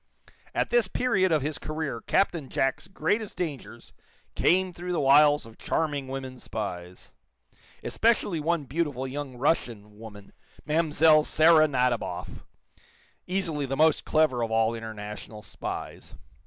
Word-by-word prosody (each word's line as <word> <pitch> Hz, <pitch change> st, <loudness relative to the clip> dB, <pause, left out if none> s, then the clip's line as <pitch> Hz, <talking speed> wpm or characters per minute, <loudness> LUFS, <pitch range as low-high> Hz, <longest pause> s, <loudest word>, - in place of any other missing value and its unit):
At -, -, 0 dB
this 240 Hz, -4 st, +3 dB
period 190 Hz, -4 st, +1 dB
of 155 Hz, -4 st, +2 dB
his 150 Hz, +1 st, -3 dB
career 155 Hz, -6 st, -4 dB
Captain 165 Hz, -, 0 dB
Jack's 135 Hz, +4 st, -1 dB
greatest 210 Hz, +2 st, -2 dB
dangers 155 Hz, -7 st, -6 dB, 0.4 s
came 185 Hz, 0 st, +2 dB
through 180 Hz, +1 st, -5 dB
the 170 Hz, -, 0 dB
wiles 145 Hz, +1 st, +5 dB
of 115 Hz, -1 st, -15 dB
charming 145 Hz, -4 st, -2 dB
women 130 Hz, -1 st, -6 dB
spies, 90 Hz, -6 st, -7 dB, 0.7 s
especially 220 Hz, -7 st, +1 dB
one 165 Hz, 0 st, 0 dB
beautiful 140 Hz, -2 st, -2 dB
young 135 Hz, -1 st, -6 dB
Russian 115 Hz, -7 st, -1 dB
woman, 105 Hz, -3 st, -12 dB, 0.3 s
Mlle. 155 Hz, 0 st, +4 dB
Sara 155 Hz, 0 st, +5 dB
Nadiboff, 125 Hz, -4 st, -2 dB, 0.8 s
easily 170 Hz, -6 st, -2 dB
the 135 Hz, +1 st, -3 dB
most 160 Hz, +1 st, +3 dB
clever 155 Hz, -6 st, +2 dB
of 115 Hz, -, -1 dB
all 110 Hz, 0 st, +2 dB
international 105 Hz, -1 st, -8 dB
spies. -, -, -7 dB
145 Hz, 130 wpm, -27 LUFS, 120-165 Hz, 0.8 s, wiles